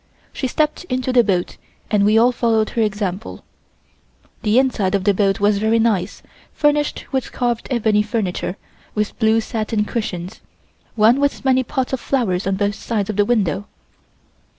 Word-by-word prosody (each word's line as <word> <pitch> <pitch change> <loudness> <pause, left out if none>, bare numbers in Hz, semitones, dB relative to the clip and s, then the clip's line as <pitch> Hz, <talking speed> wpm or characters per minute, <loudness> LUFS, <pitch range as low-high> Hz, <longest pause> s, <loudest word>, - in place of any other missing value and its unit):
She 265 - -2
stepped 300 +6 -1
into 255 -4 -2
the 245 -1 +6
boat 185 -4 -1 0.3
and 205 -2 +3
we 210 +2 +4
all 240 +2 +5
followed 225 -3 +1
her 230 - -1
example. 210 -1 -3 1.0
The 215 +1 +2
inside 220 -7 +2
of 195 - -1
the 205 0 +3
boat 195 0 +1
was 205 0 +2
very 220 +2 +2
nicely 215 -4 0 0.3
furnished 295 -1 +1
with 265 -2 -2
carved 240 -2 -2
ebony 220 -4 +2
furniture 210 -3 -2 0.4
with 210 -1 -2
blue 220 0 +3
satin 215 -1 -2
cushions, 185 -6 -4 0.5
one 225 +4 +4
with 285 -1 -1
many 260 -1 +4
pots 260 0 -3
of 265 - 0
flowers 200 -11 -1
on 195 - +1
both 205 +1 0
sides 215 -1 -2
of - - -7
the 205 0 +3
window. 205 -5 0
220 Hz, 165 wpm, -20 LUFS, 205-245 Hz, 1.0 s, the